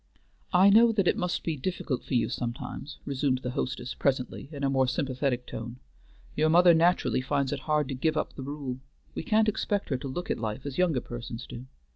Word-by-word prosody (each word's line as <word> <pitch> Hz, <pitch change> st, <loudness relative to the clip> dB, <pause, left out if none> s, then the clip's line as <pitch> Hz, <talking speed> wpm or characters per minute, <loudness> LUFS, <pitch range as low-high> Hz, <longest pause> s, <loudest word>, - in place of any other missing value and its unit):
"I 190 Hz, +2 st, +6 dB
know 230 Hz, +3 st, +7 dB
that 200 Hz, -4 st, +1 dB
it -, -, +4 dB
must 180 Hz, -5 st, -2 dB
be 165 Hz, -, -1 dB
difficult 145 Hz, -3 st, -3 dB
for -, -, -3 dB
you 120 Hz, -, +3 dB
sometimes," 125 Hz, +4 st, -5 dB
resumed 135 Hz, -2 st, 0 dB
the 125 Hz, -, -2 dB
hostess 130 Hz, -2 st, -3 dB
presently, 135 Hz, 0 st, -1 dB
in 140 Hz, -2 st, -6 dB
a 135 Hz, -, +2 dB
more 130 Hz, -1 st, +3 dB
sympathetic 130 Hz, -1 st, -1 dB
tone. 115 Hz, +1 st, -6 dB, 0.6 s
"Your 155 Hz, +1 st, +3 dB
mother 175 Hz, +1 st, +7 dB
naturally 165 Hz, -5 st, +3 dB
finds 140 Hz, 0 st, 0 dB
it 140 Hz, -, -3 dB
hard 150 Hz, -2 st, +2 dB
to -, -, -2 dB
give 155 Hz, +4 st, 0 dB
up -, -, -1 dB
the -, -, -8 dB
rule. 135 Hz, -2 st, -5 dB, 0.3 s
We -, -, -3 dB
can't 220 Hz, -3 st, +2 dB
expect 205 Hz, -1 st, -1 dB
her 135 Hz, -, 0 dB
to 135 Hz, -, -6 dB
look 175 Hz, +7 st, -4 dB
at -, -, -1 dB
life 110 Hz, +3 st, -4 dB
as 140 Hz, +1 st, -4 dB
younger 165 Hz, -8 st, +2 dB
persons 120 Hz, -1 st, -7 dB
do." 125 Hz, +2 st, -9 dB
140 Hz, 210 wpm, -28 LUFS, 130-170 Hz, 0.6 s, know